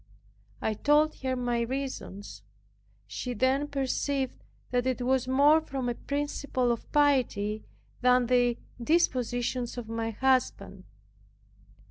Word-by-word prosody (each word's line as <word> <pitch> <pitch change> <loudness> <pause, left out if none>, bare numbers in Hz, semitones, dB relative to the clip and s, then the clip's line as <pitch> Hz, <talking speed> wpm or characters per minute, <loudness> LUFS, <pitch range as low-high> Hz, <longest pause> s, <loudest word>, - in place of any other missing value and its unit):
I 220 - +1
told 295 +7 +2
her 260 -1 -1
my 245 -1 -1
reasons. 255 -5 -5 0.6
She 250 -1 -5
then 265 +5 +1
perceived 275 -1 -2 0.3
that 250 0 +1
it 255 -1 -1
was 260 0 +1
more 285 +4 +5
from 270 -5 -4
a 240 - 0
principle 280 -2 -1
of 235 - -5
piety, 245 -8 +2 0.4
than 250 0 +4
the 245 -1 +2 0.2
indispositions 245 -4 0
of 240 -2 -5
my 225 0 -2
husband. 260 +3 0
255 Hz, 115 wpm, -28 LUFS, 240-275 Hz, 0.6 s, more